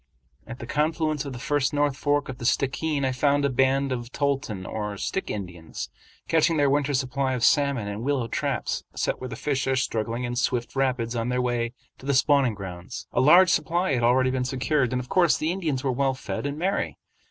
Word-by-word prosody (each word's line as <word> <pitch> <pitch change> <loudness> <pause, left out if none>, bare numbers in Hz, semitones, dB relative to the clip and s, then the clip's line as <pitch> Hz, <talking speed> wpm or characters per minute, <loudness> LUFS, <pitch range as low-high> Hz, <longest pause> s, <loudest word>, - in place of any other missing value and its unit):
At 120 - -7
the 120 - -7
confluence 155 +1 0
of 140 - -5
the - - -6
first 145 +3 0
North 145 -2 +2
Fork 145 0 0
of 130 -1 -7
the 120 - -5
Stickeen 140 +3 0
I 130 - +1
found 140 +2 +2
a 140 - +1
band 135 +2 +2
of 120 -1 -4
Toltan 135 -10 -1
or 105 -1 -4
Stick 190 - -3
Indians 90 -5 -6 0.4
catching 165 0 +3
their 145 -2 +3
winter 145 0 +1
supply 130 0 0
of 125 -2 -2
salmon 140 -7 +3
in 105 +1 -4
willow 130 -2 0
traps, - - -2
set - - -1
where 130 - -4
the 115 - -5
fish 140 +2 -1
are 135 - +2
struggling 115 -1 -1
in 120 0 -3
swift 120 0 -1
rapids 125 -3 0
on 115 +1 -1
their 125 0 0
way 120 -1 -1 0.3
to 135 - -10
the 140 - +2
spawning 135 -4 +3
grounds. 90 -3 -7
A - - +3
large 175 +7 +7
supply 175 -2 +1
had 120 - +1
already 130 +2 +3
been 130 -1 0
secured, 130 0 0
and 125 - 0
of 125 - -6
course 175 -7 +3
the 155 +2 0
Indians 160 -8 -2
were 135 - +1
well 135 +1 +1
fed 135 - -4
and 140 +1 -4
merry. 190 +5 -1
130 Hz, 215 wpm, -25 LUFS, 120-145 Hz, 0.4 s, large